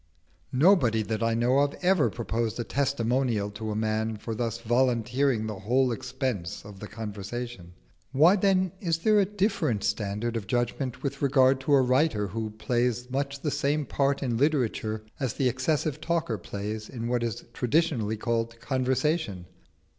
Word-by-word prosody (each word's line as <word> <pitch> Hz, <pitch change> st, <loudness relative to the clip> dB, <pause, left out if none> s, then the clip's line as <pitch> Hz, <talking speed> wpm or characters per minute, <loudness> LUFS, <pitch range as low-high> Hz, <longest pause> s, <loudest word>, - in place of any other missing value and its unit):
Nobody 130 Hz, -, +4 dB
that 110 Hz, +1 st, -3 dB
I 115 Hz, 0 st, +1 dB
know 125 Hz, +4 st, +3 dB
of 145 Hz, 0 st, +1 dB
ever 180 Hz, -3 st, +4 dB
proposed 115 Hz, -1 st, -2 dB
a -, -, 0 dB
testimonial 120 Hz, -5 st, 0 dB
to 110 Hz, +1 st, -5 dB
a 105 Hz, -, -2 dB
man 110 Hz, 0 st, -1 dB
for 110 Hz, +2 st, -5 dB
thus 115 Hz, 0 st, -2 dB
volunteering 120 Hz, +1 st, +1 dB
the 105 Hz, -3 st, -5 dB
whole 125 Hz, +6 st, +2 dB
expense 125 Hz, -7 st, -3 dB
of 100 Hz, -2 st, -11 dB
the 105 Hz, -, -7 dB
conversation. 105 Hz, -2 st, -6 dB, 0.4 s
Why 160 Hz, +7 st, +6 dB, 0.5 s
is 165 Hz, -3 st, 0 dB
there 210 Hz, +5 st, +3 dB
a 200 Hz, -, +4 dB
different 185 Hz, -, 0 dB
standard 105 Hz, +3 st, -1 dB
of 110 Hz, -4 st, -3 dB
judgment 120 Hz, +2 st, -2 dB
with 140 Hz, -1 st, -3 dB
regard 135 Hz, -1 st, +4 dB
to 135 Hz, +2 st, 0 dB
a 135 Hz, -2 st, +6 dB
writer 130 Hz, -4 st, +2 dB
who 110 Hz, +2 st, -3 dB
plays 120 Hz, +3 st, -1 dB
much 140 Hz, +1 st, -2 dB
the 150 Hz, -, -1 dB
same 145 Hz, +2 st, 0 dB
part 140 Hz, 0 st, 0 dB
in 120 Hz, -3 st, 0 dB
literature 115 Hz, -6 st, 0 dB, 0.2 s
as 130 Hz, -5 st, -2 dB
the 135 Hz, -, +1 dB
excessive 150 Hz, +4 st, 0 dB
talker 165 Hz, -10 st, -1 dB
plays 105 Hz, +4 st, -5 dB
in 115 Hz, -2 st, -5 dB
what 120 Hz, 0 st, 0 dB
is 115 Hz, -2 st, -3 dB
traditionally 120 Hz, -5 st, +1 dB
called 115 Hz, 0 st, -2 dB
conversation? 130 Hz, -, -1 dB
120 Hz, 160 wpm, -27 LUFS, 110-140 Hz, 0.5 s, Why